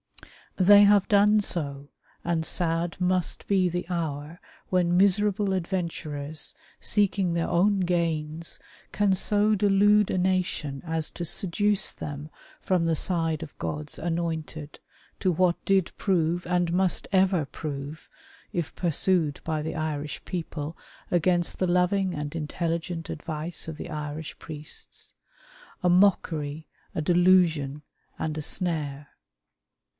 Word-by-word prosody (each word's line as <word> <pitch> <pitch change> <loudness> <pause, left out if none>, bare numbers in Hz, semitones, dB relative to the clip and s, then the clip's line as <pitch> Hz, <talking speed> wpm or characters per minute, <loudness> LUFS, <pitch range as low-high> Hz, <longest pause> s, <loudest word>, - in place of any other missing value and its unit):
They 205 +2 +7
have 205 -1 +5
done 210 +1 +5
so, 145 -7 -2 0.4
and 170 -1 0
sad 165 +1 0
must 180 -1 0
be 190 -3 +3
the 175 +1 -3
hour 160 -2 -4 0.3
when 175 -1 +2
miserable 200 +1 +3
adventurers, 165 -5 -1 0.3
seeking 200 -4 +2
their 170 0 0
own 195 +3 +2
gains, 165 -2 -1 0.3
can 205 -2 +2
so 210 +3 +2
delude 205 +1 +4
a - - 0
nation 180 -6 -1
as 160 -1 +1
to 175 - -6
seduce 195 +3 +2
them 150 +1 -7 0.3
from 180 -3 +1
the 165 -1 +2
side 165 -3 -1
of 150 - -11
God's 75 -2 -5
anointed, 160 -2 -4 0.4
to 185 - +2
what 175 +1 +1
did 195 -3 +2
prove, 175 -3 0
and 175 -1 0
must 185 0 0
ever 190 -4 +3
prove, 145 +1 -7 0.4
if 165 -3 -3
pursued 170 -2 +1
by 155 -1 -2
the 160 +1 -4
Irish 150 -2 -4
people 160 -3 -5 0.4
against 175 0 +1
the 185 - +1
loving 180 +1 +2
and 150 0 -5
intelligent 165 +1 -3
advice 160 +2 -4
of 160 -2 -6
the 175 - -7
Irish 150 0 -5
priests, 150 -1 -6 0.4
" - - -24
a 180 - +4
mockery, 160 -5 +2 0.3
a - - -2
delusion, 165 -4 +3 0.4
and 155 -1 -2
a - - -2
snare." 150 -4 -3
170 Hz, 130 wpm, -26 LUFS, 155-185 Hz, 0.4 s, They